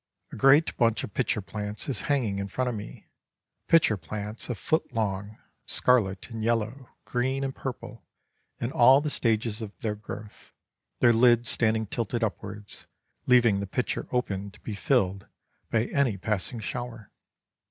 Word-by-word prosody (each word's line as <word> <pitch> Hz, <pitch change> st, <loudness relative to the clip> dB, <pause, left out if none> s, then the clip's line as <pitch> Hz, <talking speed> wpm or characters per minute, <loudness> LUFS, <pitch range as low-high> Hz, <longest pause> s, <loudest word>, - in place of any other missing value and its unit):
A -, -, -7 dB
great 135 Hz, +7 st, +5 dB
bunch 115 Hz, -2 st, +2 dB
of 100 Hz, -, -7 dB
pitcher 120 Hz, -4 st, 0 dB
plants 105 Hz, +1 st, -5 dB
is 135 Hz, -, -1 dB
hanging 115 Hz, -9 st, +1 dB
in 100 Hz, -, -3 dB
front 125 Hz, +6 st, -2 dB
of 125 Hz, -, -1 dB
me, 105 Hz, -, -9 dB, 0.6 s
pitcher 155 Hz, -10 st, +4 dB
plants 105 Hz, +7 st, -6 dB
a 120 Hz, -, -1 dB
foot 160 Hz, +6 st, -1 dB
long, 105 Hz, -2 st, -2 dB, 0.3 s
scarlet 110 Hz, -4 st, +2 dB
and 110 Hz, -1 st, -4 dB
yellow, 115 Hz, +3 st, -1 dB, 0.2 s
green 130 Hz, +2 st, -1 dB
and 135 Hz, -1 st, -2 dB
purple, 120 Hz, -4 st, -7 dB, 0.6 s
in 120 Hz, -, -2 dB
all 135 Hz, -3 st, +7 dB
the 150 Hz, 0 st, -2 dB
stages 115 Hz, -3 st, 0 dB
of 105 Hz, -2 st, -7 dB
their 110 Hz, -2 st, -1 dB
growth, 105 Hz, 0 st, -10 dB, 0.5 s
their 120 Hz, -1 st, +6 dB
lids 120 Hz, 0 st, +4 dB
standing 110 Hz, -1 st, +2 dB
tilted 115 Hz, +2 st, -2 dB
upwards, 105 Hz, -1 st, -5 dB, 0.4 s
leaving 120 Hz, -5 st, +5 dB
the 100 Hz, -, -3 dB
pitcher 125 Hz, +6 st, -2 dB
open 100 Hz, -5 st, -2 dB
to -, -, -18 dB
be 110 Hz, -, -5 dB
filled 100 Hz, -3 st, 0 dB, 0.4 s
by 115 Hz, 0 st, +2 dB
any 130 Hz, -8 st, +1 dB
passing 105 Hz, +4 st, -2 dB
shower. 115 Hz, -1 st, -6 dB
115 Hz, 155 wpm, -27 LUFS, 105-125 Hz, 0.6 s, all